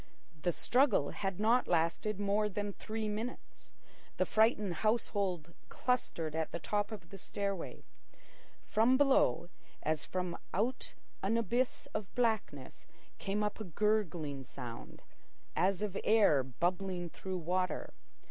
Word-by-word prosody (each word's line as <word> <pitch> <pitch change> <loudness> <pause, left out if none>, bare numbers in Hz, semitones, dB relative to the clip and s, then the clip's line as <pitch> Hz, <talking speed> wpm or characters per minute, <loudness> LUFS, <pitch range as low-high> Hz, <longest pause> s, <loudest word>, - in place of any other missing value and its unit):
The 175 - +2
struggle 245 - +3
had 195 -2 -3
not 230 +4 +4
lasted 170 +5 +1
more 205 +1 +2
than 205 0 -3
three 220 +1 -4
minutes. 220 +4 -6 0.5
The - - +3
frightened 215 -5 +3
household 200 -7 0 0.2
clustered 170 -11 -1
at 160 -1 -1
the - - -2
top 205 +5 -1
of 190 -6 -8
the 195 - -8
stairway. 200 -1 -3 0.8
From 230 +4 +4
below, 265 - +4 0.3
as 155 0 0
from 180 -2 -3 0.2
out 240 +7 -1 0.3
an 205 +4 +2
abyss 240 +3 0
of 210 -2 -4
blackness, 220 - -1 0.3
came 205 +2 -1
up 210 +1 -2
a - - -3
gurgling 175 -7 0
sound, 120 -3 -8 0.5
as 190 +1 +2
of 200 -2 -2
air 205 -10 +5
bubbling 175 +7 -1
through 185 +2 -5
water. 180 +2 -1
200 Hz, 130 wpm, -34 LUFS, 170-215 Hz, 0.8 s, air